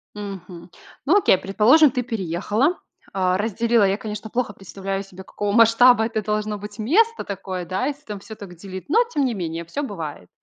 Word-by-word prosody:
Мгм. 190 -4 -8 0.4
Ну, 340 - +5
окей, 190 - +4
предположим, 245 - +5
ты 250 -1 -2
переехала, 215 - -1 0.3
а, 185 -1 +1
разделила. 225 +1 +2
Я, 195 +1 +1
конечно, 215 0 -6
плохо 240 -3 -1
представляю 195 +1 -5
себе, 190 -1 -12
какого 205 +1 -3
масштаба 230 +1 +6
это 225 -2 -2
должно 210 0 -2
быть 210 +2 -9
место 440 - +2
такое, 190 -2 -5
да, 190 +9 -2
если 290 0 -4
там 210 -6 -6
всё 220 +2 -10
так 195 -4 -11
делить, 190 +1 -9
но 455 +11 +4
тем 285 -3 +1
не 245 -3 0
менее 170 -2 -4
всё 280 - -4
бывает. 160 - -6
210 Hz, 185 wpm, -22 LUFS, 190-235 Hz, 0.4 s, масштаба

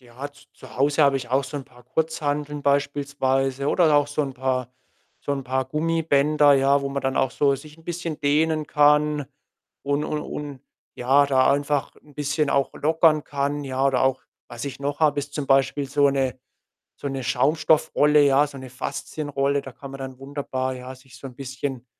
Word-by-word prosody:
Ja, 125 +3 -8
z 145 0 -21
zu - - -14
Hause 145 +3 +3
habe 140 -1 +4
ich 125 -3 -6
auch 135 +2 +1
so 135 +3 -6
'n 135 - -5
paar 125 0 -20
Kurzhanteln 150 0 -2
beispielsweise 140 -1 0
oder 160 -3 +3
auch 145 0 +4
so 145 +1 -1
'n 135 -2 -4
paar 130 -1 -2 0.5
so - - -5
'n 135 -1 -3
paar 130 +1 -1
Gummibänder, 150 -1 +3
ja, 140 +1 +3
wo 140 - -2
man 140 0 -3
dann 135 0 -1
auch 130 - +2
so 140 0 +2
sich 150 +3 -11
'n 165 - -19
bisschen 170 -2 -4
dehnen 155 +2 +1
kann 150 0 +3 0.6
und 145 +1 0
und 150 0 -2
und, 145 -4 -7 0.3
ja, 135 +3 +3
da 130 -1 +3
einfach 145 0 -1
'n 145 - -21
bisschen 145 +1 -1
auch 135 -1 +1
lockern 155 0 +3
kann, 145 0 -2
ja? 135 0 -1
Oder 135 -2 +2
auch 130 0 +1 0.3
was 120 0 -7
ich 140 -1 -6
noch 145 +2 -3
habe, 150 -2 +3
ist 145 +1 -9
zum 145 -2 -3
Beispiel 135 +1 +2
so 145 +1 +3
'ne 135 -2 -1 0.6
so - - -6
'ne 135 -1 -4
Schaumstoff-Rolle, 150 +3 +3
ja, 140 +1 +4
so 140 - -11
'ne 130 -1 -9
Faszien-Rolle. 140 +1 -2
Da 135 - -10
kann 135 +3 -10
man 135 - -9
dann 130 -1 -7
wunderbar, 135 -2 -3
ja, 130 +1 -8
sich 130 0 -17
so 135 - -8
'n 125 - -13
bisschen 135 -1 -5
140 Hz, 195 wpm, -24 LUFS, 135-145 Hz, 0.6 s, habe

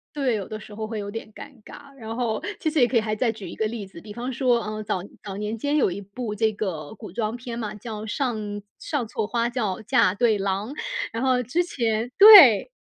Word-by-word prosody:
对， 270 -5 +1
有 200 -3 -4
的 215 - -6
时 215 -1 -12
候 220 +1 -4
会 215 -1 -5
有 200 - -5
点 220 0 -7
尴 - - -10
尬， 280 +4 -13
然 225 -2 -6
后， 235 -3 -1 0.2
其 320 - 0
实 310 0 0
也 245 - +5
可 255 - -4
以 230 - +5
还 215 -1 -2
再 230 +1 +1
举 210 -4 -9
一 - - -8
个 220 - -1
例 215 -3 -6
子， 185 - -12
比 210 +3 -10
方 245 +4 -4
说， 245 -2 +2
呃， 215 0 -5
早 205 -3 -2 0.2
早 195 -2 -6
年 210 +2 -3
间 285 +6 -1
有 295 - +3
一 190 - -5
部 210 +2 -6
这 220 +1 +1
个 180 -8 -4
古 - - -10
装 215 +3 -2
片 240 -1 -7
嘛， 220 -3 -4
叫 215 0 -7
上 240 +1 -2 0.4
《上 275 -7 -3
错 220 0 -2
花 235 +2 -1
轿 220 -7 -2
嫁 185 -3 +3
对 220 0 +2
郎》， 195 +2 -2 0.4
然 230 +2 -3
后 255 -1 +2
之 250 +9 0
前 235 -7 -2
对， 395 - +10
220 Hz, 255 characters per minute, -24 LUFS, 210-245 Hz, 0.4 s, 对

